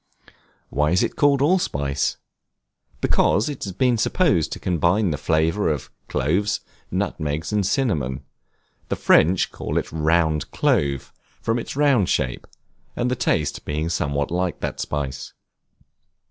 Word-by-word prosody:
Why 75 +2 +2
is 90 +3 +3
it - - -2
called 140 -2 +3
Allspice? 70 - +1 0.8
Because 105 - +2
it 145 - -6
has 95 - -4
been 120 +4 +1
supposed 145 - +2
to - - -5
combine 90 +3 +1
the 75 - -2
flavor 80 +5 +1
of 75 -4 -4 0.2
cloves, 100 +9 0 0.3
nutmegs, 75 +5 -2
and 105 -1 +2
cinnamon; 90 - 0 0.7
the - - 0
French 90 +3 +3
call - - -4
it - - -2
round 80 -1 +1
clove, 70 -2 0 0.3
from 115 +1 0
its 115 - -6
round 140 -9 +3
shape, 65 -2 -1 0.5
and 125 +1 0
the - - +1
taste 80 - 0
being 75 +2 -2
somewhat 70 -4 -1
like 90 -1 -1
that - - -3
spice. 70 -3 -4
85 Hz, 135 wpm, -23 LUFS, 75-110 Hz, 0.8 s, is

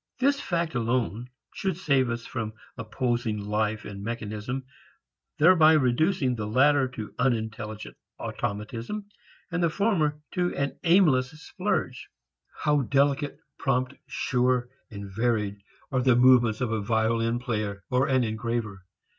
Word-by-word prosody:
This 280 +2 +2
fact 170 -2 -1
alone 120 -1 -1 0.2
should 190 -4 -2
save 140 -8 +2
us 115 0 -4
from 115 -3 -4 0.2
opposing 120 -1 -2
life 105 +1 -1
and 100 -1 -7
mechanism, 115 +3 -4 0.7
thereby 160 -1 +6
reducing 145 +1 +2
the 110 -3 -4
latter 135 +4 +4
to 115 -4 -8
unintelligent 110 -3 -2 0.2
automatism 115 - -4 0.5
and 175 +1 -1
the 170 - +3
former 160 -6 +1
to 180 -1 -1
an 140 -1 -2
aimless 165 -8 +4
splurge. 160 -8 -2 0.6
How 150 -1 +3
delicate, 140 +2 +1 0.2
prompt, 130 -1 0
sure 125 -3 0 0.2
and 100 -3 -7
varied 105 0 -1 0.3
are 130 -1 +1
the 125 -1 +4
movements 120 -3 +5
of 120 -3 0
a 110 -1 0
violin 115 +2 +1
player 105 -5 -3
or 130 +3 +2
an 130 -3 +3
engraver! 110 -3 -3
125 Hz, 130 wpm, -27 LUFS, 110-145 Hz, 0.7 s, thereby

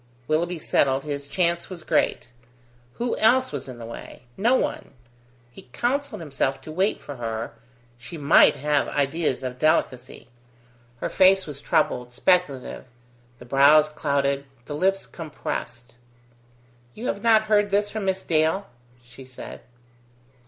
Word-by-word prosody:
Willoughby 170 +3 0
settled, 135 -3 +1
his 145 -1 -5
chance 170 +1 0
was 180 -4 -9
great. - - 0 0.6
Who 240 - -2
else 255 +4 +4
was 145 -2 -5
in 130 -2 -8
the 115 - -8
way? 115 +1 -10
No 235 +6 +3
one. - - -3 0.6
He 125 - -15
counselled 280 -1 -1
himself 135 -3 -2
to 155 - -9
wait 190 +6 0
for 145 -2 -9
her; 115 -1 -4 0.5
she 165 +7 -9
might 140 -2 +5
have 145 0 0
ideas 145 -1 -1
of 125 0 -5
delicacy. 130 -4 0 0.7
Her - - -2
face 190 0 +4
was 145 -2 -7
troubled, 125 -3 0
speculative; 150 -6 0 0.5
the 125 - -13
brows 145 +4 +5
clouded, 140 -2 -1 0.2
the - - -6
lips 195 +6 0
compressed. 125 -6 -6 1.0
"You 230 - -7
have 200 - -2
not 225 -2 +5
heard 210 -1 +2
this 205 +1 +1
from 215 -2 -4
Miss 190 0 -1
Dale?" 160 +5 +1 0.4
she 120 +2 -13
said. 130 -1 -10
155 Hz, 140 wpm, -24 LUFS, 135-190 Hz, 1.0 s, might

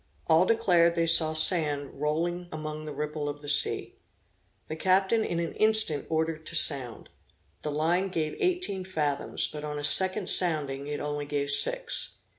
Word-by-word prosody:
All 165 +2 +3
declared 175 -7 +2
they 165 -1 0
saw 160 -1 +4
sand 150 -4 +1
rolling 170 +4 -3
among 155 0 -7
the 155 - -7
ripple 150 0 -5
of 145 0 -9
the - - -10
sea. 145 - +1 0.7
The 155 - -6
captain 190 +6 +1
in 170 - -4
an 170 -2 -4
instant 215 -10 +3
ordered 160 0 -3
to 170 - -5
sound. 135 -7 +6 0.5
The 150 - -5
line 165 +6 -1
gave 160 -4 -4
eighteen 360 - -2
fathoms; 150 -6 -3
but 150 -1 -8
on 150 -1 -6
a 145 - -6
second 185 +7 +3
sounding 145 -6 -2
it 150 0 -5
only 145 0 -5
gave 145 -1 -2
six. - - 0
155 Hz, 165 wpm, -26 LUFS, 145-180 Hz, 0.7 s, sound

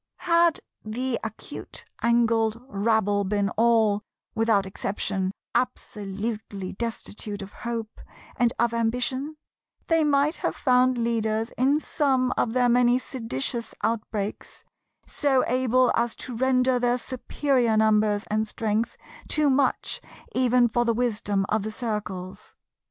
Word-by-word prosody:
Had 340 -1 +3 0.2
the 235 +3 -2
acute 220 -1 -8 0.2
angled 230 -1 +2
rabble 205 -3 +1
been 200 0 0
all, 220 -1 +3 0.3
without 220 -3 +2
exception, 190 0 -2 0.2
absolutely 210 -4 -3
destitute 210 -2 -4
of 195 - -11
hope 230 -2 -5 0.3
and 240 -2 +2
of 235 0 +1
ambition, 250 +6 -1 0.5
they 325 -1 +4
might 290 +2 +2
have - - -2
found 255 -1 +3
leaders 225 -1 0
in 275 +4 +2
some 265 -5 +1
of 225 - 0
their 250 -1 +3
many 245 0 +4
seditious 230 - -4
outbreaks, 215 -2 -3 0.4
so 275 -3 +1
able 255 0 +3
as 235 0 0
to 250 - -7
render 255 0 +2
their 245 0 +2
superior 250 -2 0
numbers 215 -1 +3
and 215 +1 +1
strength 220 +1 -1 0.3
too 300 -2 +2
much 265 0 +1 0.3
even 250 -1 +4
for 240 +1 +1
the 230 -1 +1
wisdom 210 -4 0
of 215 0 +1
the 215 +2 -4
Circles. 210 -5 -5
230 Hz, 125 wpm, -25 LUFS, 215-255 Hz, 0.5 s, they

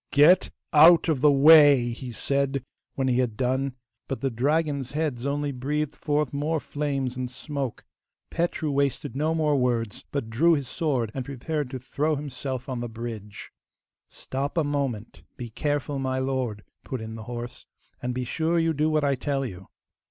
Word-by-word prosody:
'Get 160 +6 +5 0.2
out 165 +3 +7
of 145 -5 +1
the 150 0 +6
way!' 140 -3 +7
he 125 +1 -7
said 140 +2 -1 0.3
when 135 -1 0
he 125 -1 +2
had 120 -4 -1
done, 130 +1 0 0.3
but 135 - -3
the 135 -1 -1
dragon's 140 +2 0
heads 145 -5 -2
only 145 0 -1
breathed 145 +3 -2
forth 150 -3 -1
more 150 +3 0
flames 140 -4 -2
and 130 -1 -3
smoke. 135 -1 -5 0.5
Petru 170 -2 -1
wasted 140 0 -1
no 155 +3 0
more 155 -2 +2
words, 120 -5 0
but 140 -5 -2
drew 150 +10 +3
his 140 -4 -3
sword 135 - -1
and 130 - -3
prepared 145 +2 -3
to 130 - -5
throw 145 +5 -1
himself 135 -2 -5
on 130 -3 -3
the 120 0 -4
bridge. 110 -3 -7 0.6
'Stop 140 +4 -4
a 165 - +3
moment; 135 -7 -3 0.2
be 120 -2 -7
careful, 145 +2 -2
my 130 -1 -1
lord,' 130 -5 -2 0.2
put 130 - -4
in 110 0 -7
the 110 -1 -8
horse, 120 0 -7 0.3
'and 125 0 -3
be 130 - -1
sure 160 +6 0
you 165 -1 +2
do 155 +1 +1
what 155 -1 +1
I 140 -1 +3
tell 135 +1 -1
you. 95 -5 -8
135 Hz, 175 wpm, -26 LUFS, 125-150 Hz, 0.6 s, out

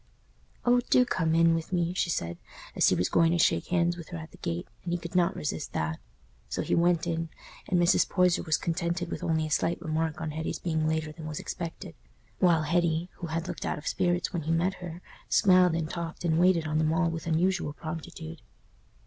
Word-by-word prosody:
"Oh, 245 0 +5
do 250 - +5
come 165 -8 0
in 165 0 +5
with 165 +1 -3
me!" 175 -1 +1
she 180 - 0
said, 85 - -2 0.4
as - - +5
he - - +3
was 90 - +1
going 165 0 +3
to - - +2
shake 165 - +2
hands 175 -1 +2
with 170 - -9
her 175 - -5
at 160 0 -9
the - - -15
gate, 85 +1 -3 0.2
and 175 - -4
he 175 - +1
could 170 0 -8
not 180 -2 +2
resist 150 0 -4
that. 80 0 -2 0.5
So - - -2
he - - -1
went 170 0 +3
in, 165 -1 -2 0.4
and 180 - +2
Mrs. 175 0 +4
Poyser 180 -2 +3
was 160 -3 +1
contented 170 +1 -2
with - - -4
only 160 -1 +1
a 155 - -6
slight 170 +2 +1
remark 160 -1 -2
on 160 -1 -3
Hetty's 160 +2 -3
being 160 -2 -1
later 160 -1 -1
than 155 0 -8
was 150 -1 -4
expected; 165 - -6 0.5
while 170 -4 +4
Hetty, 170 +1 +1
who 170 - -5
had 165 +1 -3
looked - - -5
out - - -2
of 150 - -10
spirits 175 +1 0
when 170 - -1
he 160 +2 -2
met 175 +3 +2
her, 175 0 -7 0.3
smiled 185 -4 +5
and 165 -1 -1
talked 170 +1 -5
and 160 -1 +2
waited 175 -2 +4
on 155 0 0
them 155 0 +2
all 165 +1 +2
with 165 0 -5
unusual 175 0 +1
promptitude. 160 0 -7
165 Hz, 220 wpm, -28 LUFS, 160-175 Hz, 0.5 s, Oh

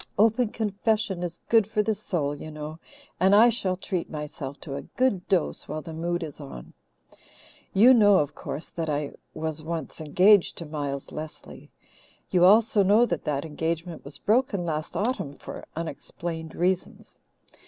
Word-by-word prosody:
'Open 225 +3 +4
confession 210 -3 -1
is 175 -1 -4
good 225 -3 +4
for 215 -1 +1
the 220 - +1
soul,' 170 -8 -2
you 145 +2 -8
know, 155 +1 -7 0.4
and 190 +2 +5
I 235 +3 +7
shall 195 -5 0
treat 185 -1 -3
myself 145 -2 -6
to 145 - -7
a - - -4
good 250 -9 -1
dose 185 -5 0
while 155 - -4
the 165 - -8
mood 170 +2 -2
is 150 -3 -8
on. 65 -2 -10 1.0
"You 230 +7 +7
know, 205 -5 +6
of 145 -4 0
course, 150 - -6
that 165 -2 -3
I 145 -1 -1 0.2
was 155 0 -3
once 165 0 -5
engaged 185 +6 +4
to 170 - -6
Miles 145 -3 -4
Lesley. 155 0 -9 0.6
You 180 -1 +5
also 210 +2 +5
know 205 +5 +5
that 170 -9 -3
that 145 -1 -1
engagement 165 +2 -3
was 140 +1 -7
broken 210 - +1
last 155 +1 -3
autumn 205 - -1
for - - -9
unexplained 165 0 -5
reasons. 180 +1 -2
170 Hz, 165 wpm, -26 LUFS, 155-205 Hz, 1.0 s, I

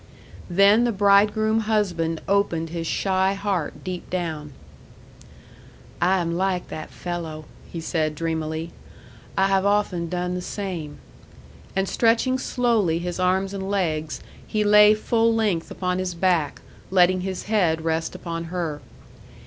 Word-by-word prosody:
Then 200 +5 +5
the 240 - +2
bridegroom 210 +2 +3
husband 185 -7 0
opened 190 -5 +1
his 165 0 -4
shy 190 +1 +1
heart 195 -5 -3
deep 185 -1 -6
down. 160 -5 -3 1.5
"I 185 +2 +4
am 170 -2 -1
like 185 0 -1
that 155 - -6
fellow," 165 -3 -6 0.3
he 170 - -5
said 155 -2 -1
dreamily. 160 0 -3 0.7
"I 190 - +4
have 195 -1 +2
often 200 -4 +1
done 180 0 -2
the 180 - -3
same." 180 -6 -5 0.8
And 195 0 +1
stretching 240 +4 +2
slowly 230 -11 +1
his 175 +1 -4
arms 190 +2 +1
and 195 -1 -4
legs, 160 -6 -1 0.3
he 215 -1 0
lay 210 0 +7
full 225 +1 +2
length 205 -7 0
upon 180 0 -2
his 185 -2 -3
back, 170 -5 0 0.3
letting 185 0 +4
his 185 0 -4
head 175 -7 +1
rest 165 0 -1
upon 165 -1 -5
her. 165 -3 -3
185 Hz, 135 wpm, -24 LUFS, 165-200 Hz, 1.5 s, lay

